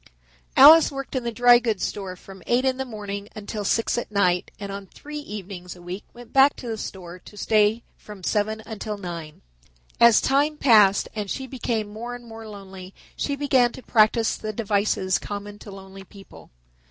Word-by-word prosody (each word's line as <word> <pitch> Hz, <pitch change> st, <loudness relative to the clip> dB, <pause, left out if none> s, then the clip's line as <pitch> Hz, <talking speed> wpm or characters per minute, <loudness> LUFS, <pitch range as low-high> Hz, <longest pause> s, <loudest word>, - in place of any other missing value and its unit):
Alice 305 Hz, +4 st, +9 dB
worked 275 Hz, 0 st, -6 dB
in 255 Hz, -, -1 dB
the 235 Hz, -, -2 dB
dry 240 Hz, +1 st, +6 dB
goods 225 Hz, -5 st, -2 dB
store 190 Hz, -3 st, -4 dB
from 190 Hz, +1 st, -14 dB
eight 245 Hz, +2 st, +2 dB
in 260 Hz, -1 st, +1 dB
the 265 Hz, -, -3 dB
morning 205 Hz, -3 st, -6 dB
until 210 Hz, 0 st, -5 dB
six 230 Hz, +3 st, +1 dB
at 240 Hz, -, -7 dB
night 180 Hz, -3 st, +1 dB
and 200 Hz, -1 st, -6 dB
on 195 Hz, 0 st, -7 dB
three 300 Hz, +7 st, -9 dB
evenings 195 Hz, -8 st, -8 dB
a 175 Hz, -, -15 dB
week 180 Hz, +3 st, -6 dB
went 240 Hz, -1 st, -14 dB
back 270 Hz, +1 st, +5 dB
to 250 Hz, -, -9 dB
the 225 Hz, -, -2 dB
store 180 Hz, -4 st, -8 dB
to 210 Hz, -, -15 dB
stay 215 Hz, +2 st, +2 dB
from 205 Hz, -3 st, -12 dB
seven 215 Hz, +3 st, -1 dB
until 215 Hz, -1 st, -5 dB
nine. 170 Hz, -5 st, -8 dB, 0.6 s
As 235 Hz, -2 st, +7 dB
time 290 Hz, +3 st, +1 dB
passed 210 Hz, -8 st, +5 dB
and 210 Hz, -2 st, -4 dB
she 265 Hz, -, -4 dB
became 235 Hz, -4 st, -3 dB
more 240 Hz, +3 st, -6 dB
and 245 Hz, 0 st, -12 dB
more 225 Hz, -1 st, -10 dB
lonely 195 Hz, -2 st, -11 dB, 0.2 s
she 285 Hz, -, -2 dB
began 265 Hz, -4 st, +2 dB
to 260 Hz, -, -11 dB
practice 220 Hz, 0 st, +3 dB
the 215 Hz, -, -5 dB
devices 200 Hz, -3 st, 0 dB
common 205 Hz, 0 st, -7 dB
to 215 Hz, -, -12 dB
lonely 195 Hz, 0 st, -11 dB
people. 195 Hz, -, -15 dB
215 Hz, 190 wpm, -24 LUFS, 195-240 Hz, 0.6 s, Alice